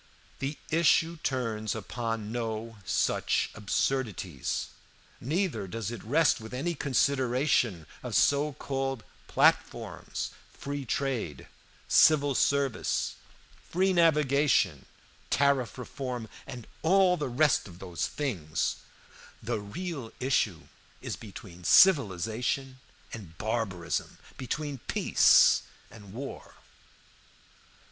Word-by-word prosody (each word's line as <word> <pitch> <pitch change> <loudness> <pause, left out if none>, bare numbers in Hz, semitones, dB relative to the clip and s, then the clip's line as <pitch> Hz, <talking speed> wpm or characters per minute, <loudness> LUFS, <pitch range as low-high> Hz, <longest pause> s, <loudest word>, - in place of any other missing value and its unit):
"The 140 +2 -3
issue 165 +1 +3
turns 115 -7 -2
upon 115 0 -4
no 115 -1 -4
such - - +1
absurdities, 105 - -2 0.5
neither 160 - -1
does 115 +2 -4
it 120 -4 -7
rest 145 +2 +3
with 110 +3 -8
any 170 +7 -1
consideration 130 - +1 0.2
of - - -4
so 145 +1 +3
called 135 -3 -3 0.2
platforms - - 0 0.3
free 140 -1 -5
trade, 120 - -2 0.4
civil 145 -3 +5
service, 140 -2 +1 0.6
free 190 +2 +2
navigation, 145 - +3 0.4
tariff 135 -5 +2
reform, 125 -2 -5 0.2
and 120 -4 -8 0.2
all 185 +2 +4
the 150 -5 -3
rest 135 +1 +2
of 90 -3 -12
those 90 -2 -3
things. 95 - -2 0.7
The - - -1
real 135 - -6
issue 110 -10 +1 0.4
is - - -5
between 95 -4 -11
civilization 125 - +3 0.3
and 90 -8 -9
barbarism, 100 -7 -2 0.2
between 145 +1 -4
peace - - +5 0.3
and 105 -3 -13
war. 135 +6 -8
125 Hz, 95 wpm, -29 LUFS, 110-145 Hz, 0.7 s, civil